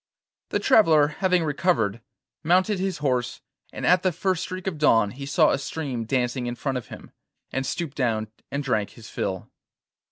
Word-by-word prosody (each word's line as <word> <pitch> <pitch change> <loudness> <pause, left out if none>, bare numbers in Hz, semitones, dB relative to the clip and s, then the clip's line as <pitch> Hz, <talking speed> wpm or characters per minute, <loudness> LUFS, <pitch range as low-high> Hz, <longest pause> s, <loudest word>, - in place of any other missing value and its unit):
The - - 0
traveller 155 -8 +5
having 180 -3 +2
recovered, 140 - 0 0.4
mounted 185 +4 +3
his 190 -2 -1
horse, 125 -2 0 0.3
and - - -5
at 180 0 +5
the 185 - +2
first 180 +1 -1
streak 185 0 -5
of 180 -6 -3
dawn 115 -8 +4
he 140 +4 -8
saw 155 +2 +4
a - - 0
stream 135 -5 -4
dancing 125 0 -1
in 120 - -3
front 130 +1 -2
of 120 - -13
him, - - -11 0.4
and 135 0 -2
stooped 165 -5 -4
down 110 -5 0 0.2
and 140 +2 -3
drank 110 -6 -1
his 115 -2 -13
fill. 95 -1 -4
140 Hz, 180 wpm, -25 LUFS, 120-175 Hz, 0.4 s, traveller